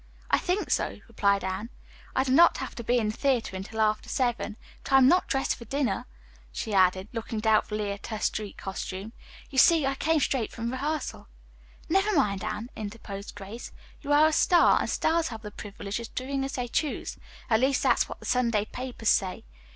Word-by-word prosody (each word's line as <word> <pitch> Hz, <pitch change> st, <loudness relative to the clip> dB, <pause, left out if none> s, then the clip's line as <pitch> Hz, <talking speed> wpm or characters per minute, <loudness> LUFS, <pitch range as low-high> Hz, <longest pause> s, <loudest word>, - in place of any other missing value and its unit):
"I -, -, +5 dB
think 375 Hz, +3 st, -1 dB
so," -, -, 0 dB
replied 200 Hz, -4 st, +1 dB
Anne. 190 Hz, +4 st, -3 dB, 0.5 s
"I 260 Hz, -, +3 dB
do 260 Hz, -, -2 dB
not 335 Hz, +6 st, +6 dB
have -, -, -5 dB
to 235 Hz, -, -7 dB
be 245 Hz, +2 st, +2 dB
in 220 Hz, -3 st, +1 dB
the 215 Hz, -, -4 dB
theatre 255 Hz, -8 st, 0 dB
until 195 Hz, +4 st, -6 dB
after 215 Hz, 0 st, +1 dB
seven. 240 Hz, -4 st, -1 dB, 0.3 s
But -, -, -4 dB
I -, -, +9 dB
am 260 Hz, -1 st, +7 dB
not 360 Hz, +5 st, +4 dB
dressed 270 Hz, 0 st, 0 dB
for 235 Hz, -, -11 dB
dinner," 275 Hz, +3 st, -1 dB, 0.4 s
she 215 Hz, -, -4 dB
added, 185 Hz, 0 st, +3 dB
looking 225 Hz, -1 st, -4 dB
doubtfully 215 Hz, -1 st, +1 dB
at 200 Hz, -, -7 dB
her 220 Hz, -, -4 dB
street 210 Hz, -1 st, -2 dB
costume. 195 Hz, +2 st, -5 dB, 0.4 s
"You 265 Hz, -, +2 dB
see, 325 Hz, 0 st, +6 dB
I 270 Hz, -, +1 dB
came 315 Hz, +3 st, +1 dB
straight 260 Hz, -5 st, 0 dB
from 235 Hz, 0 st, -4 dB
rehearsal." 295 Hz, +4 st, -3 dB, 0.6 s
"Never 390 Hz, +4 st, +2 dB
mind, 205 Hz, -9 st, +1 dB
Anne," 230 Hz, +4 st, -4 dB
interposed 205 Hz, -2 st, -7 dB
Grace, 205 Hz, +4 st, -8 dB, 0.3 s
"you 290 Hz, -, -4 dB
are 295 Hz, +1 st, +6 dB
a 315 Hz, -, +3 dB
star, 350 Hz, +2 st, +5 dB
and -, -, -2 dB
stars 330 Hz, 0 st, +1 dB
have 225 Hz, -2 st, -7 dB
the 210 Hz, -, -7 dB
privilege 200 Hz, +1 st, -6 dB
of 235 Hz, -, -9 dB
doing 270 Hz, +1 st, -2 dB
as 270 Hz, 0 st, -4 dB
they 250 Hz, -1 st, -2 dB
choose. 295 Hz, +5 st, -2 dB, 0.3 s
At 220 Hz, -2 st, +3 dB
least 265 Hz, +1 st, +2 dB
that's -, -, +3 dB
what -, -, -7 dB
the -, -, -12 dB
Sunday 235 Hz, -4 st, +1 dB
papers 250 Hz, -2 st, -3 dB
say. 185 Hz, -2 st, +1 dB
235 Hz, 200 wpm, -27 LUFS, 210-270 Hz, 0.6 s, I